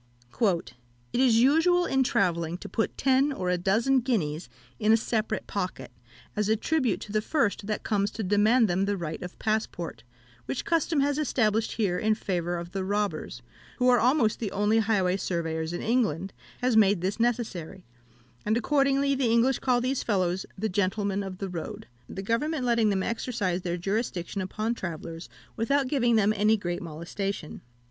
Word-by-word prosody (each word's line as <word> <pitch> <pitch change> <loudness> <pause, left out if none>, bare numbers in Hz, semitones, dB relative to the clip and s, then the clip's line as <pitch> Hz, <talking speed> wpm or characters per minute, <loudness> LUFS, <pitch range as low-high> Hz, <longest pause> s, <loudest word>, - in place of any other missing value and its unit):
"It 180 - +1 0.4
is 245 -2 +4
usual 325 +8 +4
in 270 -4 +1
travelling 170 -8 +1
to - - -9
put 225 - -2
ten 270 +2 +3
or 185 -9 -2
a 180 - +1
dozen 225 +9 +2
guineas 175 - -1 0.3
in 215 - +3
a 225 - +6
separate 220 -1 -2
pocket, 185 -8 -4 0.4
as 210 -1 0
a 220 - +4
tribute 255 - 0
to 205 - -8
the 215 0 +1
first 215 -6 0
that 210 - -2
comes 205 -2 +1
to 220 - -5
demand 215 +5 +4
them 190 +1 +1
the 200 0 -1
right 160 -3 -5
of 180 0 -8
passport, 215 - -2 0.5
which 130 - -3
custom 330 -2 +1
has 285 +1 +1
established 225 -6 +1
here 195 -5 0
in 220 -1 +2
favour 175 -4 -2
of 170 0 -7
the 190 0 -3
robbers, 205 +1 -2 0.3
who 250 0 +3
are 245 -1 +5
almost 245 -3 +2
the 215 -4 -3
only 210 +2 +2
highway 195 -4 +1
surveyors 165 -3 -2
in 175 - -4
England, 195 -7 0 0.3
has 250 -2 +2
made 205 -4 +4
this 195 +4 -2
necessary; 205 -7 -2 0.6
and 215 +2 +1
accordingly 275 +2 +2
the 265 -3 +1
English 235 +3 +3
call 250 -2 +2
these 255 +2 0
fellows 185 -3 0
the 220 +3 -1
'Gentlemen 200 0 0
of 190 -2 -6
the 195 - -4
Road,' 175 -3 -6 0.2
the 195 - -6
government 260 +6 -1
letting 230 -3 +3
them 190 -2 0
exercise 210 -6 -2
their 175 -1 -2
jurisdiction 195 -1 -2
upon 215 +5 -2
travellers 165 -4 -6 0.3
without 275 +4 +1
giving 240 -4 +2
them 215 -1 +3
any 215 +2 +3
great 175 -3 -3
molestation. 170 +2 -5
210 Hz, 175 wpm, -27 LUFS, 185-240 Hz, 0.6 s, a